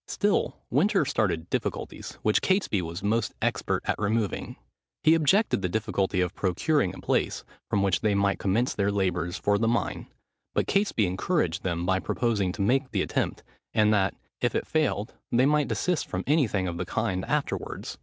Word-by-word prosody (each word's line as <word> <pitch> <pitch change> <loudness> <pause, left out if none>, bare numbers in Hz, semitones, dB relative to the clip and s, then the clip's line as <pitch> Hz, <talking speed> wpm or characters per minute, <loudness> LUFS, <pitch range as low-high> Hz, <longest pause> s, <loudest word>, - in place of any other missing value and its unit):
Still - - 0
Winter - - +3
started 80 +1 0
difficulties, - - -3
which 110 - +3
Catesby 190 - +1
was 85 +2 -6
most 105 +1 0
expert - - -1
at - - -1
removing. 105 -1 -1 0.5
He 160 - +6
objected 165 - +3
the 90 - -1
difficulty 100 -2 0
of 90 +1 -1
procuring 95 - +1
a - - -10
place, - - 0 0.3
from 100 -1 +1
which 95 -2 +1
they 105 -2 +2
might 100 0 +1
commence 110 +6 +1
their 100 0 +1
labours 90 -3 -1
for 100 0 +1
the 115 - +1
mine; 115 +1 -1 0.5
but - - +2
Catesby 195 - +2
encouraged 95 - 0
him 85 -2 -1
by 95 +1 +2
proposing 105 -4 0
to 100 - -2
make 130 +5 +2
the - - 0
attempt, - - -2 0.3
and 105 0 +4
that, 95 -2 +2 0.2
if - - 0
it - - 0
failed, 150 -9 0 0.2
they 125 +2 +4
might 150 0 +3
desist 180 -4 -1
from 90 +1 -3
any 145 -2 +3
thing 95 -3 -1
of 85 -1 -4
the 90 - -2
kind 105 -5 -1
afterwards. - - -3
100 Hz, 180 wpm, -27 LUFS, 95-120 Hz, 0.5 s, He